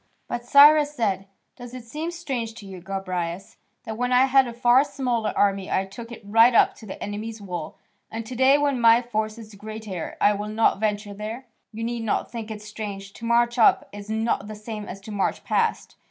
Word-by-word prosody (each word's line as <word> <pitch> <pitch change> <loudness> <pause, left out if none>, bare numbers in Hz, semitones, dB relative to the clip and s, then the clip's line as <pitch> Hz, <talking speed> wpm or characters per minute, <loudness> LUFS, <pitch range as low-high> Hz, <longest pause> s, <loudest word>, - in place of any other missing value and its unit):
But 240 - -4
Cyrus 295 +3 +6
said: 200 -6 -1 0.3
"Does 245 0 -10
it 250 - -8
seem 305 +8 -5
strange 265 -10 -4
to 220 - -11
you, 190 -2 -9
Gobryas, 185 -1 -4 0.3
that 220 -1 -6
when 245 0 0
I 250 +1 +5
had 270 -1 +4
a - - -5
far 245 +2 +4
smaller 245 -6 -2
army 195 -1 +1
I 190 - +1
took 230 +5 -10
it 235 - -10
right 225 +4 +5
up - - +5
to 220 - -12
the 190 - -8
enemy's 220 +2 -5
walls, 175 -6 -6 0.3
and 225 0 -6
to 250 - -7
day 265 +3 +5
when 285 -4 0
my 230 +1 +6
force 220 -2 -3
is 220 -2 -11
greater 210 -3 -7
I 205 - +4
will 205 +1 -4
not 215 -2 +2
venture 205 -1 -2
there? 215 +5 -6 0.3
You 225 0 -6
need 235 0 -3
not 225 - -1
think 225 -2 -6
it 210 -1 -7
strange: 200 -2 -7
to 230 - -9
march 235 +1 +2
up 225 - +4
is 205 0 -9
not 220 -1 -1
the 215 - -7
same 210 0 -7
as 195 - -8
to 215 - -10
march 205 -2 -1
past. - - -1
220 Hz, 210 wpm, -24 LUFS, 205-240 Hz, 0.3 s, Cyrus